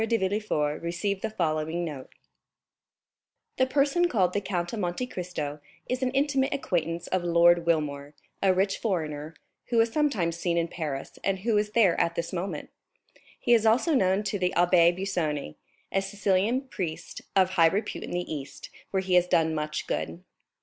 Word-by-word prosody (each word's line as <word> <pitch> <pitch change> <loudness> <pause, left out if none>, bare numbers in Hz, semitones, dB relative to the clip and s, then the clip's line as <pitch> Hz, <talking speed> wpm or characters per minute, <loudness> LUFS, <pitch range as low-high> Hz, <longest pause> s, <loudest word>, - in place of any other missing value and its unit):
de 230 +1 +2
Villefort 190 -7 -1
received 175 +4 -2
the 220 - -2
following 160 -3 -1
note: 145 -5 -7 1.5
"The 260 - +3
person 290 +6 +2
called 185 - +2
the 205 - 0
Count 175 -2 -3
of 225 - -3
Monte 180 +6 -2
Cristo 170 - -5 0.3
is 250 +1 -2
an 260 - +1
intimate 275 -1 +1
acquaintance 170 - -2
of 185 -1 -1
Lord 170 0 +4
Wilmore, 145 -3 -1 0.3
a 195 - +4
rich 195 +1 +1
foreigner, 155 -6 -3 0.3
who 235 -2 +2
is 225 0 +2
sometimes 205 - +1
seen 170 0 0
in 170 0 0
Paris 150 -6 -5
and 195 -1 0
who 225 +1 +1
is 210 0 0
there 200 -7 +4
at 170 0 0
this 170 +2 -3
moment; 185 +2 -4 0.7
he 240 - +3
is 230 -2 +5
also 250 +9 +3
known 190 -5 +2
to 205 0 -2
the 180 0 +1
Abbé 175 -1 +5
Busoni, 175 - -2 0.4
a 195 - +1
Sicilian 200 +4 +1
priest, 185 - -6
of 185 -1 +4
high 165 -3 +5
repute 205 +4 -3
in - - -7
the 175 - -1
East, 140 -1 -8 0.2
where 190 -1 -1
he 185 -1 -1
has 180 0 +5
done 160 -2 +2
much 150 -1 -3
good." 175 - -4
180 Hz, 175 wpm, -27 LUFS, 165-210 Hz, 1.5 s, is